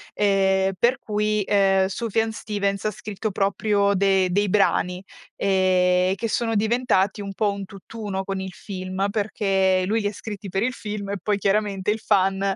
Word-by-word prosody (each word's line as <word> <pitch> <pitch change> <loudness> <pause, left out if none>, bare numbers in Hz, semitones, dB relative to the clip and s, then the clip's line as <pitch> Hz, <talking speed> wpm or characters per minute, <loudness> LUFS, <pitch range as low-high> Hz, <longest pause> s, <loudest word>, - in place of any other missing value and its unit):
ehm 195 -1 +2
per 245 +5 +3
cui, 210 -2 -1
ehm, 195 -1 +3
Sufjan 225 +2 -1
Stevens 205 -1 -2
scritto 210 +1 -5
proprio 200 +1 +1
de 190 -1 +3
dei 205 +1 +1
brani, 180 -2 +1 0.3
ehm, 185 -1 +2
che 230 +4 -3
sono 225 0 -1
diventati 215 -3 +1
un 200 -1 -6
po' 205 0 0
un 200 0 -6
tutt'uno 195 0 -6
con 195 -1 -3
il 190 -1 -5
film, 185 +1 -4
perché 195 -3 +1
lui 220 +3 0
li 205 - 0
ha 205 - -3
scritti 205 -1 -7
per 195 +4 -1
il 255 +1 0
film 205 -3 -6
e 200 - -2
poi 205 0 0
chiaramente 200 -1 0
il 220 - -2
fan, 195 -2 +2
200 Hz, 165 wpm, -23 LUFS, 190-210 Hz, 0.3 s, per